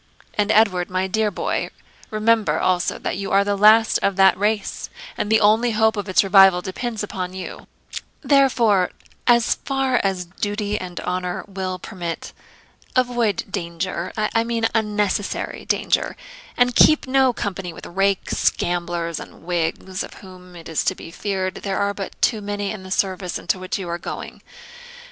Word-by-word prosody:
And, 210 0 +1
Edward, 185 -5 +3
my 185 0 0
dear 215 +3 +1
boy, 200 - -2 0.4
remember 215 0 +2
also 180 -1 +1
that - - -3
you 195 - -4
are 195 +1 +5
the 200 0 0
last 215 +2 +5
of 200 - 0
that 190 0 +6
race, 205 +1 -1 0.3
and 205 - -2
the 220 - +5
only 220 +3 +3
hope 220 +1 +3
of 205 -1 -4
its 185 - +4
revival 195 -2 +6
depends 215 +5 -4
upon 185 -3 -4
you; 185 -1 -7 0.5
therefore, 235 -9 +3 0.4
as 235 -1 +5
far 270 -2 +1
as 190 -2 -1
duty 205 +3 -3
and 180 -1 -6
honour 180 0 -3
will 190 -2 -4
permit, 175 -2 -6 0.6
avoid 240 -5 +1
danger 170 -1 -3
I 215 +1 +1
mean 230 -1 -1
unnecessary 210 -2 -1
danger - - 0 0.4
and 245 0 +3
keep 310 - +6
no 265 -1 +3
company 195 -5 -4
with - - -11
rakes, 195 +1 +1
gamblers, 175 -1 -2
and - - -12
Whigs, 175 +2 -2
of - - -7
whom, 180 -2 -13
it 165 -1 -10
is 160 - -1
to - - +1
be 165 - -10
feared, 190 -1 -3
there 195 -1 -2
are 200 0 0
but 195 -1 -7
too 220 -3 +2
many 205 0 -3
in 215 - -6
the 185 - -10
service 185 -1 -1
into 185 - -1
which 185 0 -3
you 190 -3 -6
are 170 0 -3
going. - - -7
195 Hz, 165 wpm, -22 LUFS, 185-220 Hz, 0.6 s, that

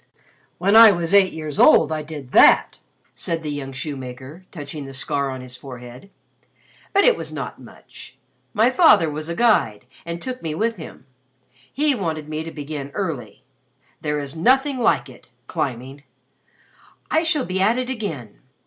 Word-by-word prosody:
"When 195 +4 +2
I 225 0 +10
was 170 -1 -1
eight 195 -2 +5
years 155 -2 -6
old - - +6
I 155 -1 -2
did 145 -4 -9
that," - - +5 0.3
said 165 -1 -4
the 150 - -4
young 140 -2 -5
shoemaker, 135 +4 -8
touching 145 -3 -8
the 135 0 -9
scar 140 +1 -2
on 130 -1 -6
his 125 0 -9
forehead. 125 +4 -11 0.8
"But 400 +1 +3
it - - +5
was - - -7
not - - -6
much. - - -15 0.3
My 230 +4 +3
father 260 - +5
was 155 +2 -6
a 170 - -3
guide 170 - +2 0.2
and 170 0 -6
took 255 +5 -6
me 155 -2 -4
with 225 +4 -1
him. 155 -5 -11 0.7
He 295 +1 +1
wanted 160 - -4
me 155 +1 -4
to 165 - -7
begin 145 -2 -6
early. 145 - -5 0.6
There 150 -1 -2
is 140 0 -6
nothing 265 - +2
like 235 - +2
it - - -16 0.2
climbing. 130 +2 -4 1.1
I 315 - +3
shall 315 -5 0
be 185 +1 -2
at 220 +5 +3
it 255 0 -2
again. 160 - -6
160 Hz, 165 wpm, -21 LUFS, 140-210 Hz, 1.1 s, I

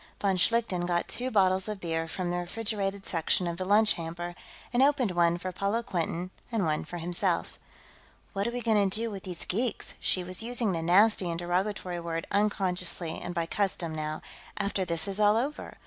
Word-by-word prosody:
Von 195 -2 +1
Schlichten 185 -2 +2
got 175 -1 0
two 250 +1 -1
bottles 190 -2 +3
of 210 -2 -4
beer 165 -2 -2
from 175 +1 -3
the 175 - -1
refrigerated 200 +1 -2
section 165 +1 +1
of 170 -1 -3
the 185 - -3
lunch 210 +3 +5
hamper 170 +1 -5 0.4
and 240 - +3
opened 275 -6 +3
one 170 -1 +3
for 185 +1 -4
Paula 200 +5 -1
Quinton 175 -1 -2 0.2
and 220 -5 +1
one 155 -1 0
for 175 - -7
himself. 175 +1 -1 0.7
"What 200 +2 -1
are - - -1
we 245 0 -3
going 210 -4 +3
to 200 - +2
do 230 0 -2
with 195 -2 -6
these 180 -3 -3
geeks," 225 +3 -1
she 185 - +1
was 185 +2 -2
using 235 -2 0
the 165 -2 -2
nasty 185 +2 +4
and 165 - -2
derogatory 180 +1 -2
word 165 -1 -3
unconsciously 185 -5 0
and 175 - -5
by 170 -1 0
custom, 180 -3 -1
now 155 0 -4 0.3
"after 200 -2 -1
this 170 -1 +4
is 195 +1 -1
all 210 +1 +5
over? 280 +6 -3
185 Hz, 195 wpm, -29 LUFS, 175-210 Hz, 0.7 s, lunch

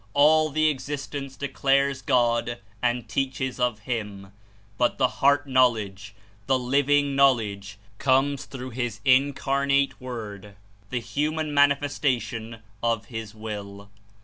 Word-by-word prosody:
All 155 +2 +5
the 155 +2 +2
existence 140 -1 -4
declares 140 0 +1
God 120 -3 +1 0.2
and 120 -1 0
teaches 130 +2 -2
of 120 -3 0
Him, 105 -4 -5 0.5
but 120 - +2
the 130 - +3
heart 145 +1 +3
knowledge, 110 -6 +1 0.3
the 130 - +3
living 140 +2 +2
knowledge, 110 -7 +2 0.2
comes 135 +1 +2
through 130 -1 -8
His 120 0 -3
Incarnate 140 +1 +2
Word, 105 -5 -7 0.3
the 125 - -1
human 150 +6 -2
Manifestation 130 -6 0 0.2
of 115 -2 0
His 110 -1 -6
Will. 100 -2 -7
130 Hz, 115 wpm, -25 LUFS, 110-140 Hz, 0.5 s, All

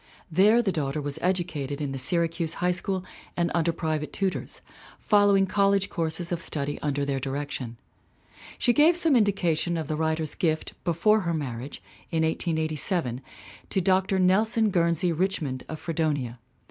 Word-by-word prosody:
There 210 +8 +5
the 195 - +1
daughter 150 -3 -2
was 145 -1 -3
educated 165 -6 -1
in 145 -2 -3
the 135 - -4
Syracuse 165 +3 -1
High 180 0 +1
School 185 +1 -2 0.3
and 170 0 +1
under 170 0 +2
private 155 -2 -3
tutors, 195 -2 -3 0.4
following 205 -2 +4
college 195 0 +2
courses 165 0 -2
of 170 -1 -2
study 145 -2 -2
under 145 -1 -1
their 140 -1 -1
direction. 135 -3 -4 0.8
She 240 - +3
gave 315 +6 +5
some 325 -5 +3
indica 195 -7 +2
tions 170 +2 -1
of 160 -3 -3
the 155 - -2
writer's 160 -1 -1
gift 160 -2 -1
before 190 +5 +3
her 170 -4 -1
marriage, 135 -3 -5 0.3
in 160 -1 0
1887, 160 - 0 0.5
to - - +1
Dr. 190 +1 +2
Nelson 215 +4 +3
Guernsey 170 0 +2
Richmond 160 -7 -2
of 160 - -5
Fredonia. 150 -8 -2
165 Hz, 155 wpm, -26 LUFS, 150-190 Hz, 0.8 s, There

